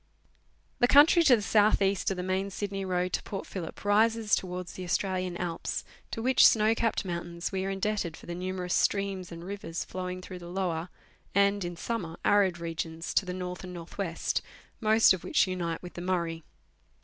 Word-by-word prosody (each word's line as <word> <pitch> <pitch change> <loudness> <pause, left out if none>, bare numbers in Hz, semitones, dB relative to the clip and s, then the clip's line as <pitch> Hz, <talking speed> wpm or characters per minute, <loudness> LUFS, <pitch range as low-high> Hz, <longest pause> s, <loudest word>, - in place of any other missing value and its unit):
The 245 - +5
country 295 +6 +7
to 260 - +8
the 215 - -3
south 210 +1 +4
east 195 -1 +1
of 195 - -2
the 180 - -3
main 190 +1 -1
Sydney 195 0 -4
road 180 -1 -1
to - - 0
Port 195 - -6
Phillip 180 +1 -7
rises 220 +1 +3
towards 180 -1 -1
the 185 - -7
Australian 185 0 -1
Alps, 170 -2 -3 0.3
to 225 - -4
which 260 +1 +5
snow 220 0 +6
capped 225 -2 0
mountains 170 -1 -4
we 190 -1 -2
are - - -1
indebted 195 -4 -2
for - - -14
the 175 - -5
numerous 180 0 -3
streams 195 -2 0
and 170 0 -8
rivers 180 -3 -5
flowing 185 0 -5
through 185 -1 -8
the 175 - -10
lower 175 -2 -2 0.5
and 200 0 +3
(in 175 0 -4
summer) 175 -6 -4
arid 195 -4 +4
regions 165 0 -4
to 190 - +2
the 180 - -3
north 180 0 -5
and 180 -1 -7
north 170 +3 -10
west, 170 -4 -1 0.4
most 220 -2 +5
of 185 - -5
which - - +3
unite 175 -3 -3
with 180 - -8
the 175 - -7
Murray. 170 -3 -1
185 Hz, 195 wpm, -29 LUFS, 175-200 Hz, 0.5 s, to